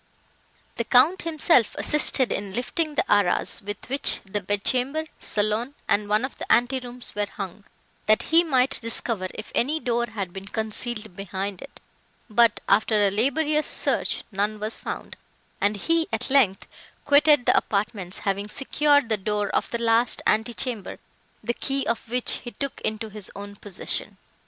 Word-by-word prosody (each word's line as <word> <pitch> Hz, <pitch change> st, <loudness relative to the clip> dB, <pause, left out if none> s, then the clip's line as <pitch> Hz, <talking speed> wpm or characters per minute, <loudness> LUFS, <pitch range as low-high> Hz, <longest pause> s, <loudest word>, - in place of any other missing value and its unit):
The 235 Hz, -, 0 dB
Count 270 Hz, +11 st, +4 dB
himself 315 Hz, -7 st, +3 dB
assisted 285 Hz, -4 st, +3 dB
in 200 Hz, -1 st, -3 dB
lifting 300 Hz, +5 st, -1 dB
the -, -, +1 dB
arras, 205 Hz, -3 st, +2 dB
with 205 Hz, 0 st, -6 dB
which 275 Hz, +3 st, +2 dB
the 205 Hz, +1 st, -3 dB
bed 205 Hz, +1 st, -2 dB
chamber, 275 Hz, +5 st, 0 dB
saloon 215 Hz, +6 st, -1 dB
and 205 Hz, 0 st, +1 dB
one 215 Hz, +4 st, +2 dB
of 260 Hz, -, -9 dB
the -, -, -4 dB
ante 245 Hz, +2 st, +3 dB
rooms 245 Hz, 0 st, -9 dB
were 205 Hz, 0 st, -1 dB
hung, 195 Hz, 0 st, -8 dB, 0.4 s
that 215 Hz, 0 st, +4 dB
he 335 Hz, +1 st, +7 dB
might 265 Hz, -5 st, +3 dB
discover 225 Hz, -4 st, -2 dB
if 215 Hz, -, -8 dB
any 295 Hz, +6 st, +1 dB
door 240 Hz, -3 st, 0 dB
had 200 Hz, -5 st, -5 dB
been 195 Hz, 0 st, -8 dB
concealed 220 Hz, -1 st, -3 dB
behind 195 Hz, 0 st, -5 dB
it; 275 Hz, -, -12 dB, 0.5 s
but, 230 Hz, 0 st, +4 dB
after 215 Hz, +2 st, +3 dB
a -, -, 0 dB
laborious 295 Hz, +8 st, +1 dB
search, -, -, 0 dB
none 210 Hz, +2 st, -1 dB
was 215 Hz, +2 st, -3 dB
found, -, -, -7 dB, 0.4 s
and 205 Hz, +1 st, +1 dB
he, 330 Hz, -, +1 dB
at -, -, -3 dB
length, 235 Hz, -9 st, +3 dB, 0.4 s
quitted 290 Hz, -2 st, +5 dB
the -, -, +4 dB
apartments, 200 Hz, -3 st, -1 dB
having 200 Hz, +1 st, -1 dB
secured 285 Hz, +2 st, +2 dB
the 220 Hz, -2 st, +1 dB
door 205 Hz, +1 st, -2 dB
of -, -, -1 dB
the 235 Hz, -, -2 dB
last 230 Hz, +1 st, +2 dB
ante 220 Hz, +2 st, +1 dB
chamber, 230 Hz, -7 st, -2 dB, 0.5 s
the 240 Hz, -, -1 dB
key 275 Hz, +2 st, -1 dB
of 230 Hz, -1 st, -2 dB
which 250 Hz, +1 st, +2 dB
he 245 Hz, -, -8 dB
took 275 Hz, +2 st, -5 dB
into 215 Hz, +1 st, -2 dB
his 210 Hz, -2 st, -5 dB
own 205 Hz, 0 st, -8 dB
possession. 200 Hz, -2 st, -2 dB
225 Hz, 165 wpm, -24 LUFS, 205-260 Hz, 0.5 s, he